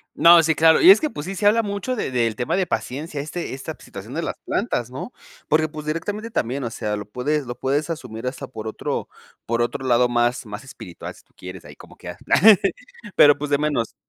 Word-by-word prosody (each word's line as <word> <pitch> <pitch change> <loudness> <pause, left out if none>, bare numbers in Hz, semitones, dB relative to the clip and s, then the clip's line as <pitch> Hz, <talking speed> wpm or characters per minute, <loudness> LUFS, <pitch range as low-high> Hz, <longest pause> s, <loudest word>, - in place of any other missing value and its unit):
No, 170 +1 +7
sí, 160 0 +2
claro. 160 +1 +5
Y 355 - +10
es - - +7
que, 310 - -1
pues 145 - -7
sí, 195 +2 -5
se 205 - -3
habla 225 +2 +4
mucho 205 +5 -3
de 210 - -3
del 115 -3 0
tema 125 +7 -1
de 190 -2 0
paciencia, 145 +2 -4
este 155 +2 -5
esta 135 - -6
situación - - -10
de - - -2
las - - -4
plantas, 120 0 -2
¿no? 135 - -7 0.3
Porque, 155 0 +2
pues, 150 0 -8
directamente 205 +8 -3
también, 130 - -2
o - - -2
sea, 105 -1 -3
lo 105 - -6
puedes, 145 +5 -1
lo 120 0 -6
puedes 145 +4 -1
asumir 125 -7 -6
hasta 125 0 -5
por 110 -3 -8
otro 110 - -4 0.4
por 115 +1 0
otro 120 +2 -2
lado 125 0 +3
más, 120 +1 0
más 105 +5 -8
espiritual 95 -9 -10
si - - -19
tú - - -37
quieres, 90 -1 -10
ahí 75 0 -13
como - - -15
que - - -10
ah. - - -8 1.0
Pero, 145 -1 +7
pues, 150 0 -5
de 145 - +4
menos 145 -6 -1
140 Hz, 230 wpm, -22 LUFS, 120-160 Hz, 1.0 s, Y